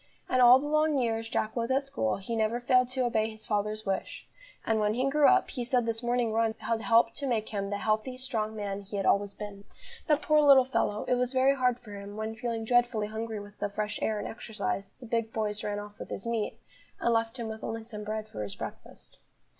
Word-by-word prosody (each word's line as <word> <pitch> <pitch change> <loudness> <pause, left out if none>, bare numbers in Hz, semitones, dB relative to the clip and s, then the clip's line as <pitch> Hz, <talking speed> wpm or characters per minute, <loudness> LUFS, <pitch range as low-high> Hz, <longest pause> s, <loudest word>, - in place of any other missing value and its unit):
And 255 - +2
all 245 +1 +9
the 275 - -4
long 305 0 +2
years 225 -3 -1
Jack 220 -2 -1
was 235 0 -1
at 270 +2 +2
school 110 - -1
he 230 +4 -4
never 225 +2 +1
failed 250 0 +3
to 255 0 0
obey 220 -2 +1
his 220 -1 -10
father's 210 +1 -1
wish; 195 -1 -3 0.4
and, 225 -1 +2
when 210 0 +1
he 255 +2 +1
grew 290 +1 +4
up, 380 0 +4
he 250 - -3
said 245 0 +1
this 225 0 -2
morning 240 -2 0
run 225 0 +1
had 225 0 -2
helped 230 0 +4
to 280 - -3
make 225 -4 0
him 200 -2 -3
the 205 - -2
healthy, 220 +5 -1
strong 225 -4 -2
man 200 -1 -3
he 200 +1 -6
had 195 - -1
always 200 0 +2
been. 205 -1 -8 0.4
But, 300 -2 +2
poor 305 0 +4
little 275 -3 +7
fellow, 210 -5 0
it - - 0
was 250 +1 0
very 260 +1 +4
hard 250 -3 +1
for 210 -4 -11
him, 200 +1 -8
when, 220 0 -3
feeling 225 -1 -3
dreadfully 240 -3 +2
hungry 220 0 -4
with 205 +1 -12
the 205 - -1
fresh 210 +1 -3
air 220 - 0
and 205 - -4
exercise, 220 -3 -4
the 255 - -10
big 230 -1 -1
boys 215 -1 -2
ran 205 0 -2
off 205 0 -8
with - - -7
his 195 - -5
meat, 230 -2 -2 0.4
and 235 - +2
left 225 +2 0
him 235 -2 -4
with 220 0 -7
only 225 0 -4
some 210 -2 -7
bread 215 0 -4
for 105 - -7
his 100 -1 -5
breakfast. - - -10
225 Hz, 240 wpm, -29 LUFS, 210-245 Hz, 0.4 s, all